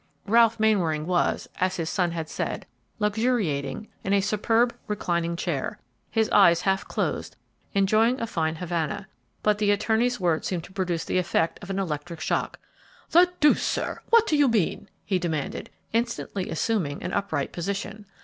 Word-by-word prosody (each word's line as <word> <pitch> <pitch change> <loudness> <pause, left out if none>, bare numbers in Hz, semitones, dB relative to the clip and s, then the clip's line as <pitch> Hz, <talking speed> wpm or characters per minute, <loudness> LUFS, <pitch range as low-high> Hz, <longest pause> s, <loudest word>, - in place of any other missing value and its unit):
Ralph 230 +1 +4
Mainwaring 175 -9 +2
was, 175 0 0
as 185 0 +1
his 165 -2 -3
son 180 0 +1
had 165 -2 -4
said, - - -4 0.3
"luxuriating" 210 - 0 0.2
in 195 - 0
a 200 - +5
superb 225 +4 +2
reclining 170 -4 -1
chair, 170 -5 -2 0.3
his 220 -1 +1
eyes 170 -4 +6
half 195 0 0
closed, - - -2 0.4
enjoying 215 +6 +3
a 230 - -1
fine 165 -7 -1
Havana, 175 +3 -3 0.4
but 210 -1 +2
the 210 -1 +2
attorney's 220 +4 +2
words 170 -4 +1
seemed 175 -3 -2
to 190 - -13
produce 180 -4 -1
the 185 - +1
effect 165 -2 0
of 195 - -10
an 195 - -2
electric 170 -2 -3
shock. - - -1 0.5
"The 355 +2 +6
deuce, 300 -1 +5
sir! - - -2
what 460 -1 +6
do 320 - +1
you 290 -1 +5
mean?" 220 -8 0 0.2
he 190 -2 +1
demanded, 160 -5 -3 0.2
instantly 230 -4 -2
assuming 165 -5 -1
an - - -4
upright 185 -9 -1
position. 200 +3 -4
195 Hz, 160 wpm, -26 LUFS, 170-220 Hz, 0.5 s, eyes